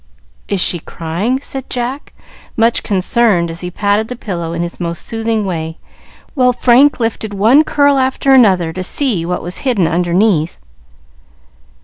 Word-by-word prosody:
"Is 200 Hz, -, -1 dB
she 175 Hz, -1 st, +1 dB
crying?" 170 Hz, +12 st, -3 dB
said 270 Hz, -2 st, -3 dB
Jack, 250 Hz, +3 st, -4 dB, 0.5 s
much 230 Hz, +1 st, +2 dB
concerned 195 Hz, -3 st, +1 dB
as 165 Hz, -, -6 dB
he 180 Hz, -, -4 dB
patted 205 Hz, +4 st, 0 dB
the 250 Hz, -, -6 dB
pillow 175 Hz, -8 st, -5 dB
in 170 Hz, 0 st, -3 dB
his 175 Hz, -, -7 dB
most 170 Hz, -1 st, -4 dB
soothing 225 Hz, -1 st, -2 dB
way, 160 Hz, -3 st, -4 dB, 0.6 s
while 250 Hz, -4 st, +2 dB
Frank 255 Hz, +4 st, +3 dB
lifted 220 Hz, -2 st, -3 dB
one 230 Hz, +10 st, +4 dB
curl 285 Hz, -2 st, +2 dB
after 265 Hz, +1 st, +1 dB
another 190 Hz, -10 st, +4 dB
to 185 Hz, -, -4 dB
see 195 Hz, -, 0 dB
what 180 Hz, -, -3 dB
was 175 Hz, +2 st, -3 dB
hidden 240 Hz, -10 st, 0 dB
underneath. 175 Hz, 0 st, +1 dB
205 Hz, 150 wpm, -15 LUFS, 175-245 Hz, 0.6 s, one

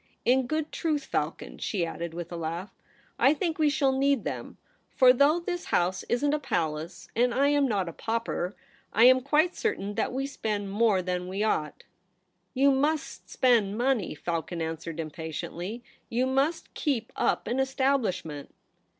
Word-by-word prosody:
In 255 Hz, +1 st, +3 dB
good 310 Hz, +1 st, -2 dB
truth, 300 Hz, -4 st, -1 dB
Falcon,' -, -, -3 dB
she 185 Hz, -6 st, -1 dB
added, 170 Hz, 0 st, -5 dB
with 175 Hz, 0 st, -6 dB
a -, -, -4 dB
laugh, 170 Hz, +3 st, -4 dB, 0.3 s
' -, -, -34 dB
I 300 Hz, -, +3 dB
think 325 Hz, +1 st, -2 dB
we 305 Hz, -1 st, +4 dB
shall 280 Hz, -2 st, +2 dB
need 275 Hz, -2 st, +2 dB
them; -, -, -5 dB, 0.3 s
for 255 Hz, -1 st, +6 dB
though 285 Hz, +6 st, +4 dB
this 350 Hz, 0 st, -4 dB
house 180 Hz, +2 st, +1 dB
isn't 285 Hz, +4 st, +1 dB
a 300 Hz, -, +1 dB
palace, 160 Hz, -, -3 dB
and 240 Hz, +1 st, +2 dB
I 280 Hz, +2 st, +4 dB
am 290 Hz, -1 st, +3 dB
not 200 Hz, -6 st, 0 dB
a 170 Hz, -, -5 dB
pauper, 225 Hz, -4 st, -2 dB, 0.4 s
I 225 Hz, -, +4 dB
am 255 Hz, +1 st, +7 dB
quite 305 Hz, +6 st, +2 dB
certain 205 Hz, -, -2 dB
that -, -, -1 dB
we 270 Hz, +2 st, -2 dB
spend 210 Hz, -7 st, -3 dB
more 205 Hz, -3 st, +3 dB
than 180 Hz, 0 st, -2 dB
we 195 Hz, +3 st, -2 dB
ought' 155 Hz, -8 st, -1 dB, 0.4 s
' 180 Hz, 0 st, -47 dB
You 275 Hz, +2 st, +5 dB
mus^ 290 Hz, +3 st, 0 dB
spend 220 Hz, -5 st, +2 dB
money,' 245 Hz, -9 st, 0 dB
Falcon 170 Hz, +2 st, -3 dB
answered 165 Hz, 0 st, -4 dB
impatiently. 165 Hz, +7 st, -5 dB
' -, -, -37 dB
You 245 Hz, +3 st, +1 dB
must 275 Hz, +5 st, 0 dB
keep 255 Hz, -7 st, -1 dB
up -, -, +1 dB
an 245 Hz, -, -1 dB
estab 265 Hz, +1 st, +2 dB
lishment.' 160 Hz, -, -4 dB
235 Hz, 175 wpm, -28 LUFS, 180-275 Hz, 0.4 s, am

